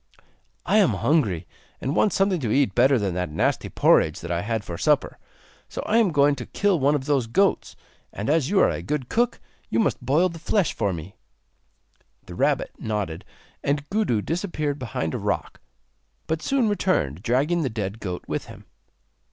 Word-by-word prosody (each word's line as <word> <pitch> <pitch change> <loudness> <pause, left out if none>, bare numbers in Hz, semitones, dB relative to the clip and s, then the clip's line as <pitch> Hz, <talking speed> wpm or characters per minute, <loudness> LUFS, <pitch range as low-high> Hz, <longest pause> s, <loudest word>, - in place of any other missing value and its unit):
'I 210 - +3
am 200 -5 +5
hungry 105 - +1 0.3
and 135 +4 -2
want 210 - +3
something 195 -2 +1
to 120 -7 -2
eat 135 -6 +2
better 135 +5 +4
than 100 -5 -1
that 90 0 -2
nasty 75 - 0
porridge - - +3
that 85 - -5
I 85 0 0
had 110 +1 -2
for 85 - -6
supper. - - +1 0.5
So - - -5
I 220 - +2
am 225 -4 +4
going 145 -1 +4
to 120 - -7
kill 200 -4 +1
one 145 +2 +3
of 135 -2 -3
those 140 -5 +1
goats, 195 - +1 0.4
and 100 - -5
as 150 -1 +2
you 200 0 +3
are - - +5
a - - -4
good 145 -4 -3
cook 240 +1 +1 0.3
you 110 - -1
must 115 - 0
boil 150 +9 +3
the 165 -1 -9
flesh 190 +2 +1
for 100 - 0
me.' 85 +2 -7 1.1
The - - -10
rabbit - - 0
nodded, 100 -7 -3 0.4
and 145 +1 -1
Gudu 195 - +1
disappeared 155 -5 -2
behind 105 -10 -3
a - - -2
rock, - - -3 0.6
but 160 0 -2
soon 265 +1 +1
returned 180 - 0
dragging 140 - +1
the 135 - 0
dead 105 -1 -4
goat 90 -4 -5
with - - -3
him. - - -13
140 Hz, 185 wpm, -24 LUFS, 105-175 Hz, 1.1 s, am